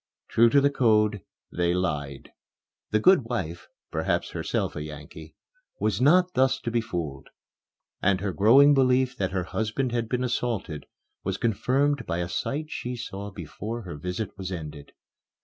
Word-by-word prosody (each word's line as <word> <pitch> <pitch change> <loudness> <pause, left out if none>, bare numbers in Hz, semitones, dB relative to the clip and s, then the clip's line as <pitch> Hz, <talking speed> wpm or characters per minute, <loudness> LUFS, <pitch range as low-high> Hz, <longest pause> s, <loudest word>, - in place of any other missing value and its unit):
True 115 +1 +5
to 140 - +5
the 140 +1 +3
code, 105 -6 +3 0.3
they 85 0 +1
lied. 75 -7 -3 0.6
The 110 - +2
good 165 - +5
wife, 90 -8 -4 0.2
perhaps - - -1
herself - - -2
a 75 - -4
Yankee, 75 +1 -9 0.4
was - - 0
not 180 +6 +5
thus 135 +1 +2
to 115 - -3
be 115 0 +1
fooled; 80 -10 -5 0.7
and 95 -1 +2
her 100 0 -2
growing 130 +10 +6
belief 130 -1 +3
that 95 -4 0
her 95 -1 -2
husband 110 +7 -2
had 115 -2 -1
been 125 +1 0
assaulted 115 - -2 0.4
was 95 0 -2
confirmed 130 +5 +1
by 85 - -1
a 85 0 -2
sight 155 - -3
she 125 +1 -4
saw 100 -3 -6
before 105 +6 -6
her 90 -4 -7
visit 90 +7 -4
was 95 -1 -4
ended. 75 -5 -7
105 Hz, 160 wpm, -26 LUFS, 90-125 Hz, 0.7 s, growing